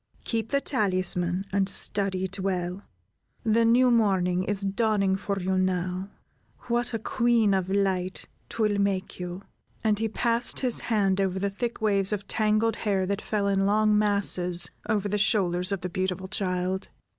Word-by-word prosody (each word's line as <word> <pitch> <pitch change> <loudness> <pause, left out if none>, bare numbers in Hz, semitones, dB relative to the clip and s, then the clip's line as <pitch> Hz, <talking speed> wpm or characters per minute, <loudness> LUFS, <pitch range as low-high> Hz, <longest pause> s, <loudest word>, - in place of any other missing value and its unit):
Keep 225 -1 -2
the 280 0 +1
talisman, 185 -6 0
and 195 0 +1
study 195 -2 +1
it 190 +1 -4
well. 185 -1 -2 0.6
The 230 0 +3
new 245 +2 +5
morning 190 -6 +2
is 200 +1 -2
dawning 200 -1 +1
for 200 0 -3
you 190 0 0
now; 185 +1 -1 0.5
what 240 0 -1
a - - +1
queen 230 -2 +2
of 190 -1 0
light 190 -2 0 0.2
'twill 210 -2 0
make 195 -2 -1
you?" 180 +2 -6 0.4
And 215 -2 +2
he 225 0 0
passed 235 +2 0
his 250 -3 +1
hand 195 -4 +1
over 190 -1 0
the 200 +1 -1
thick 235 +4 -4
waves 200 -2 +2
of 205 -1 -3
tangled 215 +1 +1
hair 195 -3 0
that 200 +2 -2
fell 205 -2 -1
in 195 0 +2
long 215 +1 +3
masses 195 -4 +1 0.2
over 205 -2 +1
the 205 +1 -1
shoulders 185 -4 +2
of 195 -3 -2
the 180 - -3
beautiful 185 0 -2
child. 185 0 -2
200 Hz, 165 wpm, -26 LUFS, 185-215 Hz, 0.6 s, new